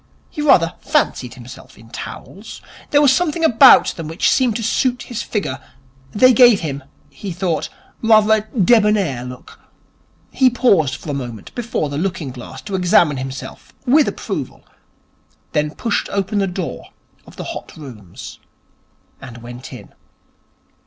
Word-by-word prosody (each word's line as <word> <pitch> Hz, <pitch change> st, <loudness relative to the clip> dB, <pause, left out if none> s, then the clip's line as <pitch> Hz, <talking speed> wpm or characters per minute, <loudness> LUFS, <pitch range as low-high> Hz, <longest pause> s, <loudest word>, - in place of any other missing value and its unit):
He 300 Hz, -, -5 dB
rather 175 Hz, -, +4 dB
fancied 210 Hz, -, -1 dB
himself 125 Hz, 0 st, -13 dB
in 115 Hz, +1 st, -17 dB
towels. 200 Hz, -, -9 dB, 0.3 s
There 290 Hz, 0 st, +4 dB
was 275 Hz, -2 st, +5 dB
something 340 Hz, 0 st, -1 dB
about 260 Hz, -1 st, +7 dB
them 165 Hz, -2 st, -6 dB
which 165 Hz, +4 st, +1 dB
seemed 250 Hz, -5 st, +2 dB
to 230 Hz, -, -3 dB
suit 245 Hz, +3 st, 0 dB
his 235 Hz, -2 st, -5 dB
figure. 165 Hz, -, -3 dB, 0.5 s
They 255 Hz, -, +5 dB
gave 240 Hz, -3 st, +6 dB
him, 140 Hz, -4 st, -4 dB, 0.3 s
he 195 Hz, +7 st, -8 dB
though, 175 Hz, -2 st, -1 dB, 0.4 s
rather 220 Hz, -1 st, +5 dB
a 215 Hz, -, +2 dB, 0.2 s
debonnaire 205 Hz, -, +3 dB
look. 125 Hz, 0 st, -11 dB, 0.7 s
He 260 Hz, -1 st, +4 dB
paused 195 Hz, -, +2 dB
for 150 Hz, -, -7 dB
a -, -, -3 dB
moment 120 Hz, -6 st, -7 dB
before 240 Hz, -, -2 dB
the 145 Hz, +1 st, -4 dB
looking 175 Hz, -6 st, -3 dB
glass 130 Hz, +1 st, -10 dB
to 205 Hz, -, -8 dB
examine 175 Hz, -5 st, +3 dB
himself, 130 Hz, 0 st, -8 dB
with 285 Hz, +4 st, +4 dB
approval, -, -, -5 dB, 0.9 s
then 150 Hz, 0 st, -1 dB
pushed 230 Hz, -3 st, -2 dB
open 200 Hz, +1 st, -1 dB
the 195 Hz, -, +1 dB
door 180 Hz, -2 st, -5 dB, 0.4 s
of -, -, -15 dB
the -, -, -7 dB
Hot -, -, -10 dB
Rooms 115 Hz, -, -11 dB, 0.8 s
and 120 Hz, -3 st, -11 dB
went 120 Hz, +2 st, -10 dB
in. -, -, -12 dB
185 Hz, 150 wpm, -18 LUFS, -, 0.9 s, about